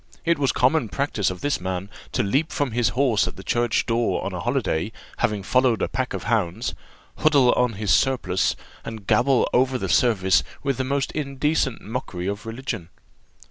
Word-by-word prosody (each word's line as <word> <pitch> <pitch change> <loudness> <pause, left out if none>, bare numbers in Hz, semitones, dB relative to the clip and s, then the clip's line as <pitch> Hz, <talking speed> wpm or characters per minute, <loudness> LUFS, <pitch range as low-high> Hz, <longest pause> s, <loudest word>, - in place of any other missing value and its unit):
It 170 -2 +2
was 140 -2 +2
the - - -6
common 130 -2 +3
practice 135 -8 0
of 90 -1 -6
this 145 -9 0
man 95 +1 -3 0.3
to - - +1
leap 140 +11 0
from 145 -4 -1
his 120 +1 +2
horse 125 -6 +3
at - - -6
the 95 - -10
church 120 +1 +1
door 115 0 0
on - - -3
a - - -4
holiday, 80 +8 -1 0.3
after 105 -2 0
following 125 0 +2
a - - +1
pack 130 -1 -2
of - - -5
hounds, 105 -7 0 0.4
huddle 140 -5 +5
on 125 -2 +2
his 100 -2 +1
surplice, 95 -6 +2 0.3
and 110 -3 -7
gabble 125 +3 +3
over 130 +1 +3
the - - -3
service 95 - +3 0.2
with 140 -2 0
the 130 - 0
most 140 +1 -1
indecent 140 -3 -1
mockery 105 -6 -5
of 100 +3 -4
religion. 115 -7 -5
120 Hz, 185 wpm, -23 LUFS, 100-135 Hz, 0.4 s, huddle